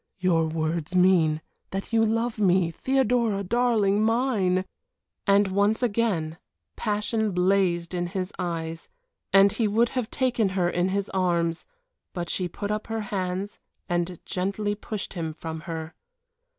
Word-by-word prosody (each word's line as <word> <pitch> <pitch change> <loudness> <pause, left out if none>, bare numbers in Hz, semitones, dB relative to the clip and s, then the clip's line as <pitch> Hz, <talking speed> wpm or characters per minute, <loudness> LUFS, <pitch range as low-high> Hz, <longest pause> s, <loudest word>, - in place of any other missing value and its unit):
"Your 170 -4 +2
words 160 +1 -2
mean 175 -4 +4 0.3
that 195 +4 -5
you 225 0 +4
love 230 +1 0
me 185 -4 +3
Theodora 235 -2 +1
darling 215 -2 +2
mine." 220 -6 +2 0.6
And 200 0 +4
once 205 +5 +2
again 200 -9 0 0.4
passion 215 0 -1
blazed 180 -1 +2
in 175 -1 -1
his 185 +1 -4
eyes, 165 -2 -4 0.4
and 195 0 +6
he 225 +1 0
would 230 +3 +2
have 255 -4 -2
taken 245 -6 +1
her 175 -2 +3
in 175 +1 +1
his 200 +1 -1
arms; 170 -3 0 0.5
but 175 -2 -3
she 185 - -1
put 205 +4 -5
up 210 0 -3
her 225 -1 -2
hands 190 +1 -3 0.3
and 175 -1 -1
gently 200 +3 -1
pushed 210 -1 -5
him 165 -4 -3
from 160 0 -6
her. 160 0 -5
195 Hz, 140 wpm, -26 LUFS, 175-215 Hz, 0.6 s, and